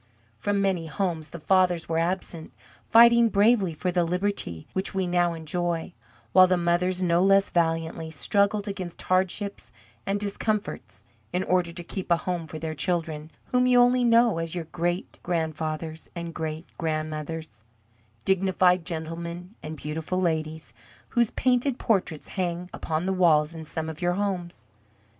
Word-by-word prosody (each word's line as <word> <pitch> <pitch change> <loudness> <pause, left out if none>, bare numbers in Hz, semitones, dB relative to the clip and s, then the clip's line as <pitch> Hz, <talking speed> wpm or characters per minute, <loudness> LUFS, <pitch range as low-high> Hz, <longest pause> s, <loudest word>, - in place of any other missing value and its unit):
From 205 -1 0
many 180 -4 0
homes 165 -3 -2
the 170 - -8
fathers 180 0 +2
were 165 0 0
absent, 170 -1 -2 0.4
fighting 235 0 +7
bravely 205 -2 +3
for 180 +3 -2
the 175 -1 +2
liberty 180 - -2
which 190 +1 -1
we 190 -1 +1
now 175 -1 +1
enjoy, 165 +1 -2 0.4
while 185 +6 +7
the 185 0 +2
mothers 175 +2 +1
no 170 0 +3
less 195 0 +4
valiantly 165 -1 0
struggled 200 +6 +1
against 185 -4 -6
hardships 185 - -1 0.4
and 200 +1 0
discomforts 205 +1 -3 0.3
in 180 +1 0
order 180 -2 +1
to 175 0 -7
keep 185 +2 -6
a 170 - +5
home 170 -1 -3
for 155 - -7
their 160 0 -4
children, 160 -2 -2 0.2
whom 250 0 +3
you 250 -1 +5
only 245 +1 +4
know 230 -5 +4
as 165 +1 -4
your 175 - -2
great 175 +2 -3
grandfathers 160 -1 -3
and 170 -1 -5
great 160 +1 -4
grandmothers, 155 - -4 0.6
dignified 185 -2 +3
gentlemen 170 +2 -5
and 155 0 -7
beautiful 160 +5 -3
ladies, 160 -3 -2 0.4
whose 235 -3 +2
painted 255 +1 +1
portraits 185 - -1
hang 180 -1 -3
upon 160 +2 -2
the 190 - +1
walls 160 -4 +3
in 160 -1 -7
some 160 +1 -4
of 160 +1 -7
your 175 0 +2
homes. 180 - -3
175 Hz, 150 wpm, -26 LUFS, 160-190 Hz, 0.6 s, fighting